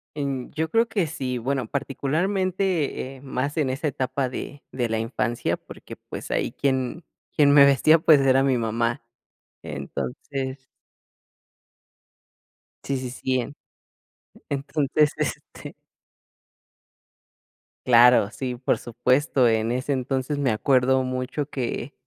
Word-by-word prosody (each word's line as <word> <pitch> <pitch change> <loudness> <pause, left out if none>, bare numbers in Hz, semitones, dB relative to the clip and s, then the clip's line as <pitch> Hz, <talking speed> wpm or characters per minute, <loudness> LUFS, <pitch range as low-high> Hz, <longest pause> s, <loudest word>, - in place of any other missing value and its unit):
Em, 140 -3 -3
yo 160 +1 -2
creo 230 +6 +3
que 205 -8 0
sí, 130 -5 -3
bueno, 130 0 -2
particularmente, 165 - -1
eh, - - -16
más 140 +2 -3
en 145 -4 +1
esa 135 +4 -2
etapa 130 -1 -2
de 140 +2 -7
de 120 -2 -2
la 110 0 0
infancia, 115 +1 -1
porque, - - -12
pues, - - -9
ahí - - 0
quien 135 +4 -1 0.3
quien 145 -2 +5
me 140 -1 +8
vestía, 140 +4 +5
pues 155 -2 +6
era 135 0 +4
mi 135 -2 +2
mamá. 115 +1 -1 0.6
Entonces 130 0 -5 2.2
Sí, 140 - -2
sí, 130 -1 -5
sí. 130 +1 -1
En 125 +4 -5 0.9
entonces, 145 +1 +1
este - - -5 2.1
Claro, 120 -3 +6
sí, 125 -1 -4
por 125 +2 0
supuesto, 125 +2 +2
en 110 0 +1
ese 130 +3 -1
entonces 135 +2 -2
me 140 -3 +1
acuerdo 130 +3 +2
mucho 130 +3 -3
que 130 0 -4
130 Hz, 120 wpm, -24 LUFS, 125-145 Hz, 2.2 s, me